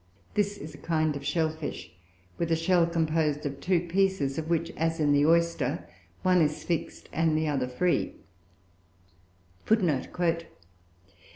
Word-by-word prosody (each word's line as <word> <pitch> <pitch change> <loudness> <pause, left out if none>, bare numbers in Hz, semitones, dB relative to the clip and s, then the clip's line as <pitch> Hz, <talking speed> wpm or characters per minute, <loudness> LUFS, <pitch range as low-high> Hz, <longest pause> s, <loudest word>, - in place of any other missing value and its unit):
This 205 0 0
is 155 -3 -8
a - - -12
kind 155 -2 0
of 140 - -6
shell 155 +2 +1
fish, 155 -1 -6 0.5
with 170 -1 -1
a - - +5
shell 170 +1 +3
composed 160 -3 0
of 140 -1 -4
two 180 0 +2
pieces, 175 -5 0
of 160 0 -5
which, 165 0 0
as 165 +1 -1
in 150 -2 +3
the 145 +1 +4
oyster, 170 - +1 0.4
one 180 -1 +4
is 150 -1 0
fixed 170 -3 -3
and 160 -1 +2
the 155 0 0
other 135 -4 0
free. 170 +8 0
160 Hz, 145 wpm, -28 LUFS, 150-170 Hz, 0.5 s, a